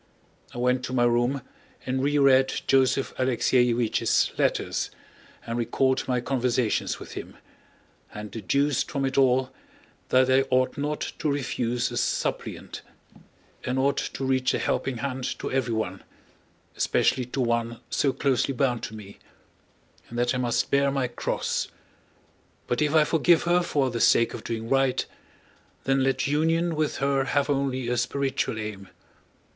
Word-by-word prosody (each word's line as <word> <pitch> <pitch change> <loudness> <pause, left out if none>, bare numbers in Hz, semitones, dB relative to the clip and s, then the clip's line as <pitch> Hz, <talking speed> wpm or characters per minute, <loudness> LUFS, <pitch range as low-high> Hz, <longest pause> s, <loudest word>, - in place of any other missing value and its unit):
I - - -10
went 125 +1 +1
to 125 - -5
my 120 -2 +3
room 120 +3 +1 0.4
and 130 0 -1
reread 140 -2 +3
Joseph 135 0 +2
Alexéevich's 125 -2 +2
letters - - 0 0.6
and 115 +1 -3
recalled 130 +3 +1
my 125 -1 +1
conversations 125 -2 0
with - - -10
him, - - -8 0.7
and 105 -1 -8
deduced 140 +7 0
from 140 -2 -1
it 135 - -2
all 130 -1 +3 0.6
that 130 0 +4
I 130 +1 +4
ought 130 0 +2
not 150 +1 -3 0.2
to 150 - 0
refuse 125 -3 -1
a - - -4
supplicant, - - -2 0.8
and 125 +1 -2
ought 140 +1 +2 0.2
to 135 - -3
reach 130 -1 +1
a - - +1
helping 135 -3 -1
hand 130 0 -3
to - - -5
everyone—especially 115 +1 -2
to 130 +2 -3
one 115 -1 -1
so 140 - +2
closely 135 0 0
bound 125 -2 +1
to 110 - -8
me—and 105 +3 -15
that 120 +1 +1
I 125 - -1
must 120 -2 0
bear 140 0 +3
my 135 -2 -1
cross. - - -2 1.0
But 120 - -1
if 150 +1 +1
I 155 - +7
forgive 165 +1 +3
her 175 +1 +3
for 140 -6 0
the 115 - -2
sake 115 - +4
of - - -7
doing 115 -1 -4
right, 135 0 +2 0.8
then 135 0 +2
let 135 0 +1
union 165 +3 +1
with 155 -1 -1
her 135 -1 +1
have 145 +1 +1
only 135 -3 -1
a 125 0 0
spiritual 130 -1 -1
aim. 105 -3 -6
130 Hz, 145 wpm, -26 LUFS, 120-140 Hz, 1.0 s, I